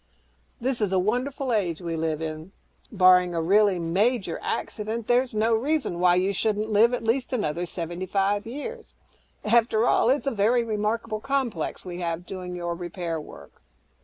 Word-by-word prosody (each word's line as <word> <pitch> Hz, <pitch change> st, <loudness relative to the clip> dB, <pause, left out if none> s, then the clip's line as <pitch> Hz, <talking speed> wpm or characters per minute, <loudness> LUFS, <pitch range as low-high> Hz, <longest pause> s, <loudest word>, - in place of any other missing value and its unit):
This 250 Hz, -1 st, -1 dB
is 205 Hz, -3 st, +1 dB
a 190 Hz, -, +2 dB
wonderful 250 Hz, +6 st, -1 dB
age 180 Hz, -7 st, 0 dB
we 170 Hz, -2 st, -4 dB
live 160 Hz, -1 st, -2 dB
in. 160 Hz, +4 st, -6 dB, 0.4 s
Barring 180 Hz, -3 st, +5 dB
a 165 Hz, -, 0 dB
really 200 Hz, +2 st, +4 dB
major 185 Hz, +3 st, 0 dB
accident, 220 Hz, +1 st, -3 dB
there's 245 Hz, 0 st, +1 dB
no 220 Hz, +2 st, +2 dB
reason 265 Hz, -, 0 dB
why 180 Hz, 0 st, +4 dB
you 190 Hz, +2 st, +1 dB
shouldn't 215 Hz, +2 st, -1 dB
live 220 Hz, +3 st, +5 dB
at 245 Hz, -, -6 dB
least 245 Hz, +3 st, 0 dB
another 175 Hz, -7 st, -1 dB
seventy 175 Hz, +2 st, -5 dB
five 200 Hz, +3 st, 0 dB
years. 440 Hz, -, -7 dB, 0.5 s
After 225 Hz, 0 st, +3 dB
all, -, -, +3 dB
that's 270 Hz, +4 st, +2 dB
a 275 Hz, -, +1 dB
very 230 Hz, +3 st, +2 dB
remarkable 215 Hz, 0 st, -2 dB
viral -, -, -18 dB
complex 260 Hz, -, -2 dB
we 180 Hz, -1 st, -6 dB
have 170 Hz, 0 st, -3 dB
doing 180 Hz, -1 st, -6 dB
your 175 Hz, -1 st, -3 dB
'repair' 170 Hz, -2 st, -4 dB
work." -, -, -14 dB
205 Hz, 170 wpm, -25 LUFS, 175-235 Hz, 0.5 s, Barring